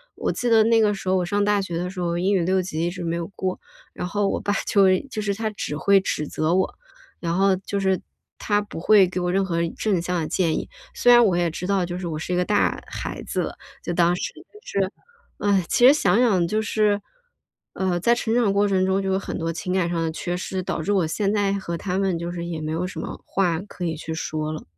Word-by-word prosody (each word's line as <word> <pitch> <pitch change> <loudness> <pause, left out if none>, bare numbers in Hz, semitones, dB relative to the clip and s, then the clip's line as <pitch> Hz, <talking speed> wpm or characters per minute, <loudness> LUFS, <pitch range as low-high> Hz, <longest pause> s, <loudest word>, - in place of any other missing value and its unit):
我 - - -1
记 245 - -1
得 225 -1 +6
那 230 +1 +4
个 210 -1 +3
时 195 -2 -5
候 190 - +3
我 180 - 0
上 205 +3 0
大 205 -1 +2
学 175 -3 -4
的 180 +1 -2
时 185 0 -8
候， 170 -1 -1
英 190 +3 +1
语 190 - +3
六 185 +2 +2
级 170 -2 -3
一 - - +1
直 180 0 -6
没 165 0 -1
有 170 -1 -4
过。 185 -1 -2 0.3
然 180 - -4
后 205 +2 0
我 - - -1
爸 205 - -1
就 200 -2 +4
是 185 0 +4
一 - - -8
就 220 -5 -4
是 205 -1 0
他 220 0 -2
只 200 -7 -4
会 195 +6 +4
指 155 -5 -2
责 155 +3 0
我， 190 - +1 0.5
然 170 -1 -2
后 195 0 +4
就 195 +2 -4
是 190 -1 +2 0.4
他 205 -1 +1
不 205 -5 -8
会 200 +3 +6
给 180 0 -3
我 180 0 -1
任 195 +1 +2
何 175 -3 -2 0.2
正 200 -6 +1
向 175 0 -1
的 155 - -2
建 165 -2 +1
议。 - - -4 0.2
虽 245 - +4
然 240 -1 +8
我 185 -5 +2
也 175 -1 +1
知 180 +3 -5
道 195 -2 +1
就 175 +1 -5
是 180 - -4
我 160 -2 -3
是 160 +3 -3
一 180 - +1
个 180 - +1
大 205 +1 +1
孩 - - -5
子 - - -2
了 - - -5 0.3
就 - - -3
当 175 0 +3
时， - - -3 0.2
但 420 - -16
是， 195 -1 -1 0.7
唉， - - -10
其 245 - +6
实 275 - +8
想 290 -6 +2
想 195 -9 +3
就 215 +3 0
是， 210 -2 +1 0.7
呃， 185 -2 0
在 235 +7 +3
成 225 -2 -1
长 235 -5 +3
过 200 +1 +2
程 190 -2 +2
中 190 +1 +1
就 195 0 -1
有 190 - +1
很 - - -5
多 165 -1 -2
情 175 +2 -4
感 180 -3 +1
上 170 -1 -1
的 160 - -1
缺 175 +2 -3
失， 185 +1 -3
导 170 - -3
致 170 - -1
我 190 -5 +2
现 200 +5 0
在 200 -2 +1
和 190 -4 -3
他 185 +1 -3
们 190 -3 +1
就 170 +1 -4
是 170 -1 -5
也 170 -2 -4
没 155 - -3
有 165 +3 -1
什 - - -7
么 - - -6
话 175 -4 0
可 185 -3 -7
以 160 - -1
去 160 +1 -6
说 155 -1 -3
了。 155 - -6
185 Hz, 290 characters per minute, -23 LUFS, 170-205 Hz, 0.7 s, 然